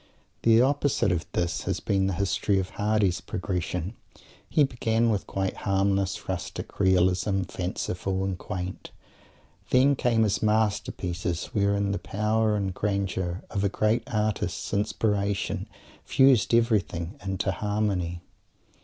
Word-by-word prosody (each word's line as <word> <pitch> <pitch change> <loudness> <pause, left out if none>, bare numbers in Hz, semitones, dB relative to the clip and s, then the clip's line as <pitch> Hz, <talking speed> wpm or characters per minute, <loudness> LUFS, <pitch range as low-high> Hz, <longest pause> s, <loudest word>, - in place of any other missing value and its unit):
The 115 0 +5
opposite 145 -5 +2
of 85 -2 -1
this 85 -1 -1
has - - -1
been 95 -1 +1
the 95 - 0
history 100 +1 +1
of 95 -1 -2
Mr. - - -18
Hardy's 105 -4 +1
progression. 90 0 -3 0.6
He 150 - +4
began 115 -3 +1
with 100 -3 -2
quite 95 -1 -2
harmless 100 -1 0
rustic 95 -2 -5
realism, 95 +1 +3
fanciful 95 +1 -3
and 95 -1 -1
quaint. 90 +1 -6 0.8
Then 135 +2 +5
came 120 -3 +2
his 105 -3 +1
masterpieces 100 -5 0
wherein 100 -2 +1
the 100 - -1
power 105 +1 +1
and 100 -2 -1
grandeur 95 -3 -2
of 100 - -1
a 100 - +2
great 110 +4 +1
artist's 110 -3 -1
inspiration 100 -1 0 0.3
fused 130 -6 +4
everything 95 -7 0
into 95 0 -1
harmony. 95 -4 -1
100 Hz, 125 wpm, -27 LUFS, 95-110 Hz, 0.8 s, The